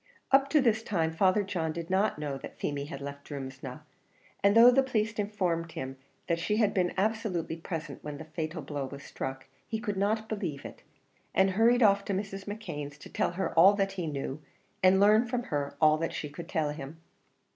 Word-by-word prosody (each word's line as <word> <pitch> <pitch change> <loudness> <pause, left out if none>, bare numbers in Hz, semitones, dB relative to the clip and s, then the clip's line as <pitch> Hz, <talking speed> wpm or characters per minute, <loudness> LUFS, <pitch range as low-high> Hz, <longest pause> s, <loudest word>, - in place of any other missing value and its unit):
Up 275 0 +5
to 300 0 +4
this 225 -3 +2
time 170 -8 0
Father 190 +4 +3
John 175 -5 -2
did 170 +2 -6
not 195 0 +2
know 145 -2 -3
that - - -10
Feemy 140 -1 -2
had 140 -1 -7
left 140 0 -7
Drumsna; 135 -1 -7 0.6
and 200 +2 +5
though 240 +2 +10
the 270 +2 +5
police 225 -4 0
informed 180 -5 -1
him 130 0 -5 0.3
that 170 -1 0
she 210 +5 0
had 215 -3 +3
been 180 -2 +1
absolutely 200 -5 -1
present 165 -3 -6
when 150 -1 -5
the 160 - -8
fatal 160 0 -4
blow 140 0 -4
was 140 +1 -9
struck, 135 0 -5 0.2
he 220 - -2
could 210 -3 -3
not 215 +3 0
believe 180 -11 -4
it, - - -9 0.5
and 190 +1 +4
hurried 230 +5 +4
off 200 -1 +5
to 200 - -1
Mrs. 195 0 -4
McKeon's, 150 -9 -6
to - - -12
tell - - 0
her 190 +2 -2
all 190 +5 +7
that 195 -1 0
he 180 -4 -4
knew, 140 0 -4 0.4
and 185 +1 +6
learn 215 +4 +5
from 245 0 -1
her 145 -7 -3
all 155 -1 +5
that 165 - -2
she 150 - -4
could 170 +3 -9
tell 155 -2 0
him. 150 +1 -8
180 Hz, 205 wpm, -29 LUFS, 150-210 Hz, 0.6 s, though